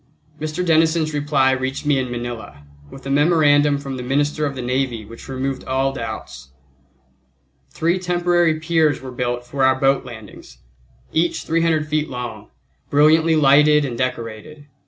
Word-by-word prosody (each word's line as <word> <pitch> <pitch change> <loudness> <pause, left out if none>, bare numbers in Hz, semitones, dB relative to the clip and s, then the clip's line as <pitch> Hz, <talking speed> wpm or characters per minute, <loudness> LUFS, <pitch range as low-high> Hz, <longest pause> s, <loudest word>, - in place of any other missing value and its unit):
Mr. 155 +4 -3
Denison's 160 -1 +2
reply 145 -2 +2
reached 130 +2 -3
me 145 -2 +2
in 130 -1 -3
Manila, 120 -12 -7 0.3
with 135 - -13
a 135 - -3
memorandum 145 -1 +3
from 135 -2 -6
the - - -5
Minister 145 +4 0
of 140 - -6
the 130 - -5
Navy 125 -3 -2
which 115 +2 -12
removed 135 0 -3
all 135 +1 0
doubts. 65 - -7 1.2
Three 170 +3 0
temporary 175 -2 +1
piers 160 -3 +1
were 130 -1 -9
built 120 -1 -3
for 135 +2 -2
our 130 0 +4
boat 135 0 +2
landings, 110 - -12 0.6
each 170 +2 0
300 165 -2 0
feet 155 0 -1
long, 120 -4 -7 0.4
brilliantly 160 +3 +4
lighted 150 0 +5
and 125 -3 -4
decorated. 125 +4 -5
140 Hz, 150 wpm, -20 LUFS, 125-155 Hz, 1.2 s, lighted